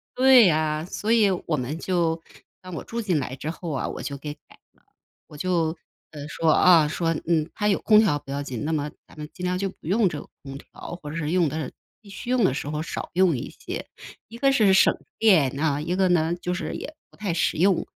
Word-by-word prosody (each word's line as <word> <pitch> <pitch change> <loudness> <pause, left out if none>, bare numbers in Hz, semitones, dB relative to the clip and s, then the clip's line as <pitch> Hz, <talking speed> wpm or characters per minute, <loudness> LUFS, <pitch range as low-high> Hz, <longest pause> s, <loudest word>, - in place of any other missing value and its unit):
对 255 -6 +7
啊。 155 0 0
所 210 +4 -3
以 220 -3 +5 0.2
我 160 - +1
们 135 +3 -3
就 170 -3 0 0.4
让 185 -1 -9
我 165 - -5
住 235 - -5
进 185 -8 0
来 130 -1 -4
之 150 +3 -5
后 170 0 -7
啊， 135 - -2
我 - - -6
就 140 -1 -5
给 145 +1 -6
改 150 - -27 0.3
了， - - -33 0.5
我 150 - -12
就， 165 -1 0 0.3
呃， 145 -1 -8
说， 160 +1 +1
啊， 165 -2 +6
说： 165 +2 -1 0.2
“嗯， 160 -2 +2
它 210 - -1
有 200 - +2
空 215 -1 +5
调 190 -9 +3
不 140 - -10
要 140 +1 -2
紧， 130 -3 -5
那 160 - -1
么 150 -1 -1 0.2
咱 - - -18
们 150 - -7
尽 180 - -9
量 180 0 -1
就 195 0 -1
不 - - -17
用 200 +2 +3
这 150 -3 -5
个 - - -11 0.2
空 135 -1 -8
调， 155 - -10
或 145 - -6
者 - - -7
是 150 -2 -2
用 175 -2 +3
的 150 -1 -4 0.3
必 210 - -16
须 240 +5 -6
用 255 -2 +3
的 135 - +3
时 145 - -4
候 150 +1 -3
少 165 - -5
用 180 -5 +3
一 - - -6
些。” - - -7 0.4
一 230 - -10
个 275 +1 +4
是 215 -8 +4
省 190 - +5 0.2
电 160 - +4
啊， 145 -2 +1
一 170 +4 -2
个 190 -1 +2
呢 170 -1 +2
就 180 0 -2
是 - - -4
也 310 - -7 0.2
不 - - -22
太 200 -5 -2
实 165 - 0
用。 185 +2 +3
165 Hz, 260 characters per minute, -24 LUFS, 150-190 Hz, 0.5 s, 对